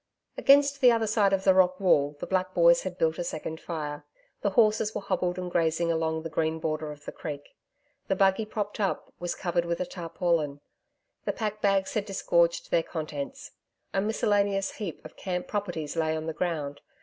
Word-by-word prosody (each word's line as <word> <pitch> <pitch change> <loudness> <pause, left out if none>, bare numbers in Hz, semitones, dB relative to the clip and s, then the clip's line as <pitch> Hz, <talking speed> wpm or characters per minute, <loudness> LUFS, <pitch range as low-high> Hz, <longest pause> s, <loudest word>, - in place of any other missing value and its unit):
Against 280 0 +4
the 250 -2 +8
other 230 -1 +2
side 210 -2 +3
of 195 -1 +1
the 190 - +6
rock 185 -1 +4
wall, 145 -6 +3
the - - -4
black 185 0 -1
boys 170 0 +6
had 185 -1 -5
built 160 -1 +1
a - - 0
second 160 -1 -5
fire. 150 -3 -5 0.4
The 200 - +2
horses 215 +1 +3
were 210 - -2
hobbled 180 -2 -1
and 180 -1 -4
grazing 170 0 +1
along 160 -1 -1
the 165 - -4
green 160 0 0
border 155 -1 -2
of 145 -1 -12
the - - -5
creek. 145 -3 -6 0.6
The 195 - +1
buggy 195 +3 +3
propped 210 -1 -4
up, 195 -3 -2
was 175 0 -3
covered 175 -2 0
with 170 0 -2
a 180 - 0
tarpaulin. 165 -4 -1 0.7
The - - 0
pack 215 -1 -3
bags 195 -1 +2
had 215 -3 -1
disgorged 170 -4 +1
their 170 - +4
contents. 155 -4 -6 0.4
A 195 - +2
miscellaneous 205 -2 +1
heap 195 -7 -6
of - - -11
camp 180 -1 -3
properties 175 -8 -3
lay 160 -1 0
on 155 - -5
the 160 - -3
ground. 150 -4 -3
175 Hz, 195 wpm, -28 LUFS, 160-200 Hz, 0.7 s, the